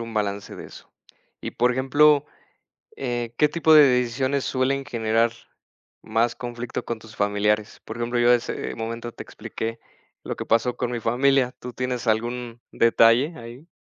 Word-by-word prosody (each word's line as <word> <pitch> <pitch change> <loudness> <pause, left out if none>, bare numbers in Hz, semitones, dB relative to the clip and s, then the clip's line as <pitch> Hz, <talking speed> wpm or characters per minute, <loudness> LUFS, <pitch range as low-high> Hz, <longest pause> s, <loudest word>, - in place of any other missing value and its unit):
un 115 -1 -7
balance 100 -1 -2
de - - -9
eso. - - -14 0.5
Y, - - -5
por 125 +1 +2
ejemplo, 145 +3 +4 0.7
eh, 120 -2 -3
¿qué 150 - +5
tipo 160 0 +3
de 150 - +9
decisiones 130 +1 +1
suelen 135 +1 0
generar 115 -3 +1 0.7
más 115 +2 0
conflicto 120 -1 -5
con 120 - -3
tus 110 0 -14
familiares? 105 +1 0
Por 110 - -7
ejemplo, 120 +1 -2
yo 120 0 +5
ese 120 - -2
momento 115 +1 -5
te - - -10
expliqué 115 +1 -6 0.4
lo - - -4
que - - -6
pasó 115 +2 +2
con 120 - -2
mi 120 - -2
familia. 125 +2 +2
¿Tú 125 - -7
tienes 125 -1 -3
algún 120 +1 -1
detalle 115 +6 +4
ahí? 120 +7 -11
120 Hz, 160 wpm, -24 LUFS, 115-130 Hz, 0.7 s, de